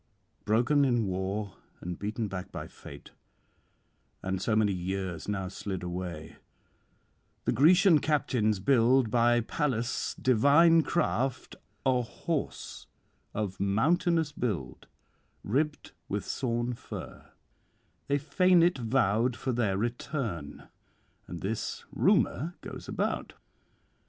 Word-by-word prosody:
'Broken 125 +7 +3
in 120 -4 +2
war 95 +2 -3 0.2
and 90 0 -6
beaten 105 +2 -2
back 95 -1 -6
by - - -6
fate, - - -12 1.1
and 95 0 -2
so 110 - +1
many 110 -2 +3
years 90 -2 -4
now 95 -2 -2
slid 95 0 -5
away, 85 -3 -6 1.1
the - - +2
Grecian 170 - +6
captains 125 -9 +1
build 125 +1 +3
by 120 0 +4
Pallas' 120 -1 -2
divine 145 +7 +5
craft 135 -6 -1 0.3
a 130 -2 +3
horse 145 +6 -4 0.5
of 100 -3 -3
mountainous 160 - +2
build, 90 - -4 0.6
ribbed 150 +7 -1 0.2
with 100 0 -2
sawn 120 -1 -1
fir; 120 - -9 0.8
they 140 - +2
feign 170 +5 +4
it 175 -5 +2
vowed 115 0 +1
for 130 - -2
their 110 -5 0
return, 115 - -4 0.6
and 85 - -7
this 105 +3 -3
rumour 165 +7 +2
goes - - -8
about. - - -2
115 Hz, 110 wpm, -29 LUFS, 100-140 Hz, 1.1 s, Grecian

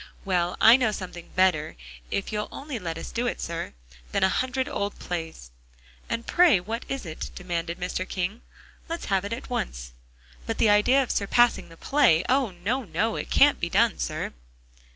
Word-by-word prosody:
"Well, 180 -2 0
I 230 +3 +8
know 245 -4 +1
something 180 -4 -7
better, 185 -5 +2 0.3
if 200 - -2
you'll 210 0 -2
only 275 -4 -6
let 165 -4 -4
us - - -7
do 240 +1 -1
it, - - -2
sir, 170 0 -4 0.4
than - - +1
a 190 - +5
hundred 260 +4 -1
old 205 -8 -3
plays." 160 - -6 0.6
"And 230 0 -2
pray 345 - +5
what 225 +6 -5
is 270 -5 -3
it?" 160 -2 -6
demanded 175 -1 -4
Mr. 185 +1 -3
King, 195 +5 -3 0.5
"let's 335 +1 -4
have 195 0 +2
it 200 - -5
at 250 +2 -6
once. 60 - -3 0.6
But - - -2
the 215 - +4
idea 245 +7 +4
of 250 - -4
surpassing 240 +2 +2
the 165 - -14
play! 240 - +3
Oh, 260 -2 +2
no, 200 +9 -2
no, 220 +3 -1
it - - -5
can't 290 +1 +5
be 170 - -2
done, 225 +4 +2
sir!" - - -3
200 Hz, 185 wpm, -26 LUFS, 175-245 Hz, 0.6 s, I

